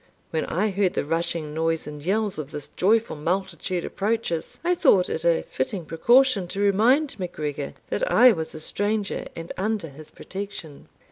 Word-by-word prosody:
When 160 Hz, -, 0 dB
I 205 Hz, +5 st, 0 dB
heard 190 Hz, -1 st, +1 dB
the -, -, 0 dB
rushing 165 Hz, -1 st, -2 dB
noise 165 Hz, 0 st, 0 dB
and 150 Hz, -1 st, -8 dB
yells 205 Hz, +1 st, 0 dB
of 145 Hz, -2 st, -5 dB
this 150 Hz, -2 st, -6 dB
joyful 220 Hz, +1 st, +2 dB
multitude 180 Hz, +2 st, -2 dB
approach 220 Hz, 0 st, -1 dB
us, 165 Hz, -1 st, -4 dB
I 350 Hz, +1 st, +3 dB
thought 260 Hz, -, +4 dB
it 160 Hz, -, -3 dB
a 170 Hz, -1 st, +3 dB
fitting 170 Hz, +6 st, -3 dB
precaution 235 Hz, -, +3 dB
to 195 Hz, -, -5 dB
remind 225 Hz, +8 st, +3 dB
MacGregor 150 Hz, -6 st, -4 dB, 0.2 s
that -, -, 0 dB
I 250 Hz, 0 st, +8 dB
was 160 Hz, -7 st, -4 dB
a -, -, -6 dB
stranger, 205 Hz, +5 st, -2 dB
and 165 Hz, 0 st, -6 dB
under 205 Hz, -4 st, -1 dB
his 150 Hz, +2 st, -12 dB
protection. 190 Hz, -7 st, -8 dB
185 Hz, 175 wpm, -25 LUFS, 160-215 Hz, 0.2 s, I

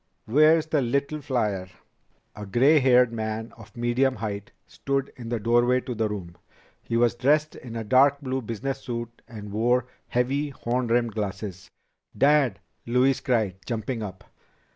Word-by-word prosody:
Where's 155 Hz, +6 st, +4 dB
the 155 Hz, -2 st, +1 dB
little 140 Hz, +4 st, -1 dB
flier?" 105 Hz, -9 st, -1 dB, 0.7 s
A 105 Hz, -1 st, -8 dB
gray 135 Hz, +10 st, +5 dB
haired 125 Hz, -2 st, +4 dB
man 110 Hz, 0 st, -4 dB
of 110 Hz, +1 st, -15 dB
medium 125 Hz, +3 st, +1 dB
height 105 Hz, -3 st, -5 dB
stood 140 Hz, 0 st, -3 dB
in 120 Hz, -2 st, -8 dB
the 120 Hz, -1 st, -1 dB
doorway 120 Hz, +3 st, +3 dB
to 125 Hz, -, -5 dB
the 110 Hz, -1 st, -1 dB
room. 90 Hz, -5 st, -7 dB, 0.4 s
He 115 Hz, -, -2 dB
was 120 Hz, 0 st, +3 dB
dressed 150 Hz, +5 st, +1 dB
in 120 Hz, -2 st, -9 dB
a 115 Hz, -, -3 dB
dark 135 Hz, +5 st, +4 dB
blue 130 Hz, -2 st, -3 dB
business 120 Hz, +4 st, -4 dB
suit 120 Hz, -1 st, -6 dB
and 105 Hz, -4 st, -9 dB
wore 120 Hz, +4 st, +2 dB, 0.2 s
heavy 135 Hz, +4 st, 0 dB
horn 125 Hz, -2 st, -2 dB
rimmed 120 Hz, -1 st, +1 dB
glasses. 100 Hz, -2 st, -5 dB, 0.5 s
"Dad!" 140 Hz, -4 st, +3 dB, 0.3 s
Louise 125 Hz, +3 st, +2 dB
cried, 110 Hz, -7 st, 0 dB
jumping 115 Hz, 0 st, -3 dB
up. 100 Hz, -2 st, -7 dB
120 Hz, 155 wpm, -25 LUFS, 110-135 Hz, 0.7 s, gray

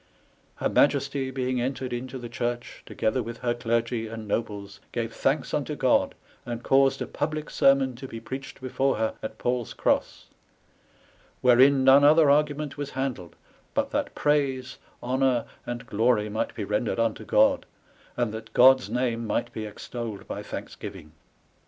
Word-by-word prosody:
Her -, -, -1 dB
Maiesty 140 Hz, -1 st, +2 dB
being 130 Hz, -1 st, -1 dB
entered 130 Hz, 0 st, -3 dB
into 130 Hz, +2 st, -5 dB
the 120 Hz, -2 st, -7 dB
church, 120 Hz, +1 st, -4 dB
together 110 Hz, +4 st, 0 dB
with 115 Hz, 0 st, -6 dB
her 120 Hz, -1 st, +1 dB
Glergy 115 Hz, -1 st, -1 dB
and 110 Hz, -2 st, -7 dB
Nobles, 100 Hz, -2 st, -3 dB
gave -, -, -3 dB
thanks -, -, 0 dB
unto -, -, -1 dB
God, -, -, +2 dB, 0.3 s
and 120 Hz, -1 st, -5 dB
caused 135 Hz, 0 st, +3 dB
a -, -, -4 dB
publike 155 Hz, +1 st, -3 dB
Sermon 135 Hz, -1 st, +4 dB
to 135 Hz, +1 st, -7 dB
be 115 Hz, -, -7 dB
preached 130 Hz, +4 st, -8 dB
before 135 Hz, +1 st, 0 dB
her 110 Hz, 0 st, -1 dB
at 110 Hz, -, -6 dB
Pauls 125 Hz, -1 st, -2 dB
Grosse; -, -, 0 dB, 1.2 s
wherein 130 Hz, +2 st, +6 dB
none 135 Hz, +2 st, +7 dB
other 150 Hz, 0 st, +6 dB
argument 150 Hz, 0 st, +1 dB
was 145 Hz, -1 st, -4 dB
handled, 130 Hz, -11 st, -4 dB, 0.4 s
but -, -, 0 dB
that -, -, -2 dB
praise, 135 Hz, -4 st, 0 dB, 0.2 s
honour, 130 Hz, 0 st, +1 dB, 0.2 s
and 120 Hz, -1 st, -5 dB
glory 110 Hz, -1 st, +1 dB
might 110 Hz, +2 st, -2 dB
be 110 Hz, -, -3 dB
rendered 105 Hz, +3 st, -1 dB
unto 115 Hz, 0 st, 0 dB
God; -, -, +3 dB, 0.5 s
and 120 Hz, -3 st, 0 dB
that 110 Hz, 0 st, -8 dB
God's 130 Hz, -2 st, +6 dB
name 115 Hz, -1 st, -1 dB
might 110 Hz, -, -1 dB
be 110 Hz, -, -4 dB
extolled 110 Hz, 0 st, -7 dB
by -, -, -5 dB
thanksgiving. 75 Hz, -, -8 dB
125 Hz, 155 wpm, -26 LUFS, 115-135 Hz, 1.2 s, none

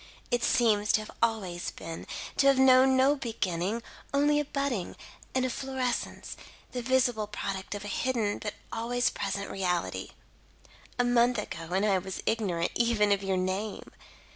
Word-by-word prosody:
"It 245 Hz, -1 st, +1 dB
seems 210 Hz, -3 st, +3 dB
to 215 Hz, -, +3 dB
have 215 Hz, -, -9 dB
always 200 Hz, -7 st, 0 dB
been; 165 Hz, 0 st, -8 dB, 0.3 s
to 275 Hz, -, +4 dB
have 275 Hz, -1 st, +6 dB
known 260 Hz, 0 st, +6 dB
no 270 Hz, +3 st, +5 dB
beginning, 220 Hz, -, -2 dB, 0.3 s
only 295 Hz, +1 st, +4 dB
a 295 Hz, -, 0 dB
budding, 275 Hz, -9 st, -2 dB, 0.4 s
an 260 Hz, 0 st, +2 dB
efflorescence, 255 Hz, 0 st, -3 dB, 0.4 s
the 250 Hz, -, -3 dB
visible 245 Hz, -3 st, +2 dB
product 195 Hz, -1 st, -4 dB
of 205 Hz, -, -6 dB
a -, -, -4 dB
hidden 220 Hz, -1 st, 0 dB
but 210 Hz, -1 st, -4 dB, 0.2 s
always 245 Hz, +2 st, 0 dB
present 200 Hz, 0 st, -3 dB
reality. 180 Hz, -3 st, -1 dB, 0.9 s
A 245 Hz, -, +3 dB
month 245 Hz, 0 st, +3 dB
ago 165 Hz, -5 st, -5 dB
and 195 Hz, +2 st, +2 dB
I 195 Hz, -3 st, +3 dB
was 190 Hz, +1 st, -6 dB
ignorant, 185 Hz, -7 st, 0 dB
even, 230 Hz, -3 st, +2 dB
of 200 Hz, -1 st, +3 dB
your 195 Hz, -1 st, 0 dB
name. 190 Hz, +3 st, -3 dB
220 Hz, 155 wpm, -29 LUFS, 195-250 Hz, 0.9 s, have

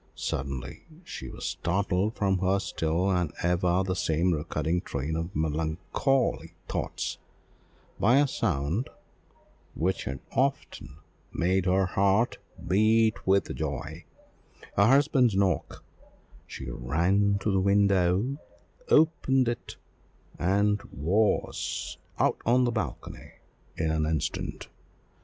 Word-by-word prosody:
Suddenly 65 Hz, -2 st, -4 dB, 0.2 s
she 65 Hz, -, -7 dB
was -, -, -8 dB
startled 95 Hz, +3 st, 0 dB
from 95 Hz, -3 st, +1 dB
her 95 Hz, +1 st, +2 dB
still 90 Hz, 0 st, -1 dB
and 90 Hz, -5 st, 0 dB
ever 90 Hz, +1 st, +2 dB
the 95 Hz, -, -1 dB
same 85 Hz, 0 st, +1 dB
recurring 80 Hz, +2 st, -1 dB
train 70 Hz, +3 st, -3 dB
of 85 Hz, +3 st, -4 dB
melancholy 80 Hz, -, -1 dB
thoughts, -, -, -3 dB, 0.8 s
by 125 Hz, +3 st, +4 dB
a 145 Hz, 0 st, +4 dB
sound 95 Hz, -, -1 dB, 0.9 s
which 90 Hz, +3 st, -1 dB
had 65 Hz, +1 st, -4 dB
often 130 Hz, -, -2 dB, 0.3 s
made 95 Hz, +2 st, +1 dB
her 95 Hz, +1 st, +3 dB
heart 100 Hz, +5 st, +1 dB, 0.3 s
beat 110 Hz, +3 st, +3 dB
with 95 Hz, +1 st, +2 dB
joy 70 Hz, -4 st, -4 dB, 0.7 s
her 100 Hz, +2 st, +5 dB
husband's 135 Hz, -4 st, +4 dB
knock; 95 Hz, -1 st, 0 dB, 0.6 s
she 65 Hz, -, -8 dB
ran 85 Hz, +12 st, +1 dB
to 100 Hz, +2 st, -1 dB
the 95 Hz, -, +2 dB
window, 100 Hz, +5 st, +2 dB, 0.5 s
opened 135 Hz, -5 st, +3 dB
it, 120 Hz, -1 st, -4 dB, 0.6 s
and 100 Hz, +3 st, +2 dB
was 95 Hz, -, -1 dB, 0.2 s
out -, -, +1 dB
on 125 Hz, +2 st, +3 dB
the 120 Hz, -, +1 dB
balcony 110 Hz, -2 st, -5 dB, 0.4 s
in 80 Hz, -1 st, 0 dB
an 80 Hz, -1 st, 0 dB
instant. 80 Hz, -2 st, -3 dB
95 Hz, 110 wpm, -28 LUFS, 80-110 Hz, 0.9 s, her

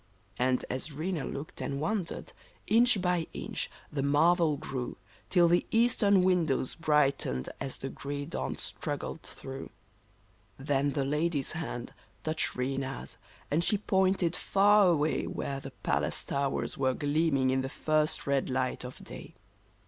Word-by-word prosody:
And 125 Hz, 0 st, +2 dB
as 130 Hz, +5 st, -4 dB
Rena 160 Hz, +1 st, -2 dB
looked 140 Hz, +3 st, -6 dB
and 140 Hz, -, -2 dB
wondered, 180 Hz, +3 st, -2 dB, 0.3 s
inch 235 Hz, 0 st, +5 dB
by 180 Hz, -2 st, +1 dB
inch -, -, -4 dB, 0.2 s
the 140 Hz, -, 0 dB
marvel 155 Hz, +2 st, +4 dB
grew, 130 Hz, -3 st, -4 dB, 0.3 s
Till 175 Hz, -2 st, +5 dB
the 175 Hz, +1 st, +3 dB
eastern 215 Hz, -4 st, +4 dB
windows 170 Hz, -8 st, +2 dB
brightened 145 Hz, -, +1 dB
as 135 Hz, -1 st, -4 dB
the 135 Hz, -, -5 dB
gray 145 Hz, 0 st, -4 dB
dawn 165 Hz, -, -3 dB
strug 145 Hz, -2 st, -3 dB
gled 160 Hz, -, -6 dB
through. 135 Hz, 0 st, -8 dB, 0.9 s
Then 140 Hz, 0 st, 0 dB
the 140 Hz, -3 st, 0 dB
lady's 150 Hz, 0 st, 0 dB
hand 155 Hz, -7 st, -5 dB, 0.3 s
touched 155 Hz, 0 st, 0 dB
Rena's, 135 Hz, +1 st, -3 dB, 0.3 s
and 160 Hz, +4 st, +2 dB
she 210 Hz, -, +5 dB
pointed 190 Hz, -3 st, +2 dB
far 200 Hz, +1 st, +5 dB
away, 155 Hz, -3 st, +2 dB
Where 135 Hz, -1 st, -3 dB
the 135 Hz, -, -7 dB
palace -, -, -1 dB
towers 140 Hz, -1 st, -1 dB
were 130 Hz, -1 st, +2 dB
gleaming 145 Hz, -3 st, +2 dB
in 130 Hz, 0 st, +2 dB
the 130 Hz, -, -3 dB
first 155 Hz, +1 st, 0 dB
red 140 Hz, -1 st, +1 dB
light 130 Hz, 0 st, -1 dB
of 125 Hz, 0 st, -9 dB
day. -, -, -9 dB
150 Hz, 145 wpm, -30 LUFS, 135-175 Hz, 0.9 s, inch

